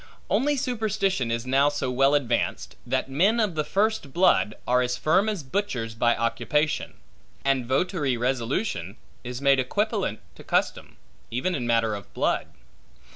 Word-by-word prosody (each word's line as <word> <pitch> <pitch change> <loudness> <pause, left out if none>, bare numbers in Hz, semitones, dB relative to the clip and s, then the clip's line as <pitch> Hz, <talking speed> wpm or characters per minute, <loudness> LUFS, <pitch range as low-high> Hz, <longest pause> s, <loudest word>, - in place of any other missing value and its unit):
Only 290 +3 +2
superstition 215 - -1
is 115 +1 -2
now 135 +3 +3
so 145 -3 -2
well 135 +3 +3
advanced, 125 -5 -1
that - - 0
men 190 - +2
of 210 -5 +1
the 155 -1 -1
first 205 -5 0
blood, 170 - +3
are 125 +1 +3
as 125 0 -1
firm 190 +7 +2
as 200 -8 -3
butchers 130 - -2
by 120 +1 +2
occupation; 120 +6 0 0.5
and 135 -3 +1
votary 140 -1 0
resolution, 120 - -2 0.3
is 125 +1 -6
made 140 -1 +5
equipollent 205 - -1 0.2
to - - -14
custom, - - -1 0.3
even 130 +11 -1
in 125 -7 -2
matter 115 -2 +2
of 100 -3 -8
blood. - - 0
135 Hz, 150 wpm, -25 LUFS, 120-190 Hz, 0.5 s, made